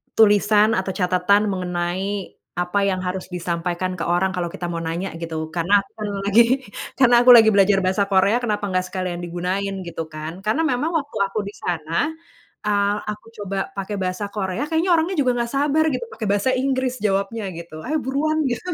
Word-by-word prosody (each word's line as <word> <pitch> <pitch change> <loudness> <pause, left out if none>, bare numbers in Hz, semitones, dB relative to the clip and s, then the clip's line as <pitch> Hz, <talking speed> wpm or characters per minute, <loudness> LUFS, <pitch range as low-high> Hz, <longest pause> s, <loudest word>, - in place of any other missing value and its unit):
tulisan 210 0 +5
atau 190 0 -1
catatan 185 +3 +2
mengenai 185 +2 -3 0.2
apa 180 +3 0
yang 185 -2 0
harus 185 0 -3
disampaikan 175 +1 -2
ke 165 - -3
orang 175 +2 +2
kalau 180 -2 -2
kita 175 +1 -5
mau 170 - -3
nanya 165 +3 -3
gitu 160 -1 -5
karena 175 +5 +2
aku 195 - -20
pernah 205 -2 -4
lagi 200 +4 +5 0.5
karena 245 -2 +4
aku - - +7
lagi 225 -2 +8
belajar 200 -1 +4
bahasa 190 +2 +1
Korea 195 +3 +3
kenapa 210 -4 -2
nggak 185 0 0
sekalian 180 -2 -2
digunain 190 +3 -3
gitu 170 -2 -5
kan 155 +2 -7
karena 220 +9 +1
memang 315 +1 0
waktu 290 -7 -2
aku 200 +2 0
di 200 - -6
sana, 170 - -2 0.5
eee, 205 0 +2
aku 210 0 -6
coba 195 -1 -3
pakai 195 0 -5
bahasa 185 +2 -2
Korea 190 +6 -2
kayaknya 325 +4 0
orangnya 335 +4 0
juga 255 -6 +1
nggak 235 0 -2
sabar 300 +2 +2
gitu 255 - -3
pakai 225 - -6
bahasa 205 +4 +1
Inggris 260 -1 0
jawabnya 200 +2 0
gitu, 165 -2 -9
"Ayo 310 -1 -1
buruan" 310 +4 0
Gitu, 240 +8 -4
kan 360 - -2
195 Hz, 185 wpm, -22 LUFS, 180-225 Hz, 0.5 s, lagi